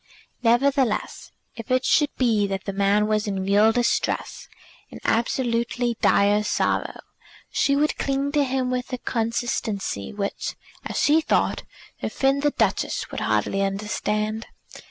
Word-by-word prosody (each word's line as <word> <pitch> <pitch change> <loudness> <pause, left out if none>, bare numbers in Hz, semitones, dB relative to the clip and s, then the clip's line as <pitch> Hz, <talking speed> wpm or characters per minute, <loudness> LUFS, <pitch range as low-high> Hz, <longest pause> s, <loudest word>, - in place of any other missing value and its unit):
Nevertheless, 250 0 +1 0.3
if 230 -2 -9
it 255 0 +2
should 295 -2 +3
be 220 -5 +2
that 195 -1 -3
the 200 - -3
man 200 +1 +2
was 215 0 0
in 195 -2 -2
real 205 +3 +4
distress, 240 +1 -1 0.4
in - - -10
absolutely 235 0 0
dire 205 +1 +4
sorrow, 210 - -1 0.5
she 280 - +2
would 300 +2 +1
cling 275 +1 -1
to 295 -1 +2
him 260 -1 -1
with 250 0 -3
a 255 - -2
constancy 225 - -2
which, 200 -1 -4 0.3
as - - -5
she 310 +2 +4
thought, - - +1 0.4
her - - -3
friend 270 +1 +1
the 295 - +3
Duchess - - -1
would - - -4
hardly 195 - 0
understand. 210 +2 -2
230 Hz, 140 wpm, -24 LUFS, 210-260 Hz, 0.5 s, real